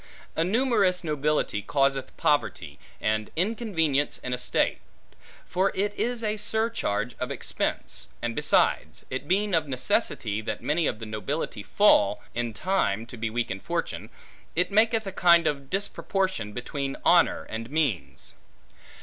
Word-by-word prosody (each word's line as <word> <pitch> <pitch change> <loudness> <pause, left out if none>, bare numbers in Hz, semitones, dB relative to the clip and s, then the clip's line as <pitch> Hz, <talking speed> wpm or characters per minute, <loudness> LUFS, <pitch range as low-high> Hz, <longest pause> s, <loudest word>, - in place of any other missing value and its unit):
A 165 - +2
numerous 200 -3 +2
nobility 150 -8 0
causeth 135 +1 0
poverty, 90 - 0 0.2
and 110 0 0
inconvenience 165 - 0
in 125 - -4
a - - 0
state; - - +1 0.7
for 190 +3 +1
it 205 +2 0
is 240 +1 -2
a 215 0 0
surcharge 215 - -1
of - - -2
expense; - - -3
and 120 -1 -3
besides, - - +1
it 130 +2 -4
being 200 +3 +1
of 160 -2 +2
necessity, 115 -4 0
that 110 - -4
many 155 +2 +1
of 110 - -1
the 110 - -7
nobility 110 +2 -3
fall, 105 - +4
in 120 -1 -2
time, 110 - 0
to 120 - -10
be 115 -1 -2
weak 120 +1 -2
in 95 - -4
fortune, - - -3 0.5
it 180 +4 +1
maketh 220 +1 +3
a 195 - -4
kind 170 -2 +5
of 140 -3 -1
disproportion, 190 - -1
between 135 +4 -4
honor - - +4
and 115 +1 -6
means. 95 - -2
145 Hz, 145 wpm, -26 LUFS, 115-195 Hz, 0.7 s, kind